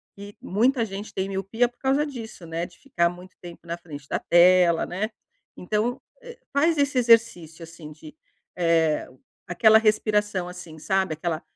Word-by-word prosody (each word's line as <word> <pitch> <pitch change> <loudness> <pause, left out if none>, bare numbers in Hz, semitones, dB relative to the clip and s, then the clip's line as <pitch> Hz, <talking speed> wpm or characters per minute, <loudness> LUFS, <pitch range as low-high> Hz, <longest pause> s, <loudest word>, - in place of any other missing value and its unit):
que 200 +1 -11
muita 235 +5 +1
gente 205 0 -8
tem 190 +1 -3
miopia 195 +5 -1
por 245 - -35
causa 275 +3 +1
disso, 230 - -9
né, 165 +1 -4
de 175 - -16
ficar 255 -11 0
muito 180 +1 -13
tempo 175 -1 -12
na 170 +1 -4
frente 150 -5 -11
da - - -1
tela, 175 -1 +4
né, 195 +5 -3 0.5
então, 215 +6 -2 0.2
eh, 485 -1 -12 0.2
faz 315 +3 +2
esse 280 -2 0
exercício, 225 -9 +2
assim, 165 -2 -11
de, 155 0 -13 0.4
eh, 165 -3 +1 0.4
aquela 220 +5 +5
respiração, 210 -3 0
assim 180 -3 -10
sabe, 190 0 0
aquela 160 0 -3
190 Hz, 160 wpm, -24 LUFS, 170-225 Hz, 0.5 s, aquela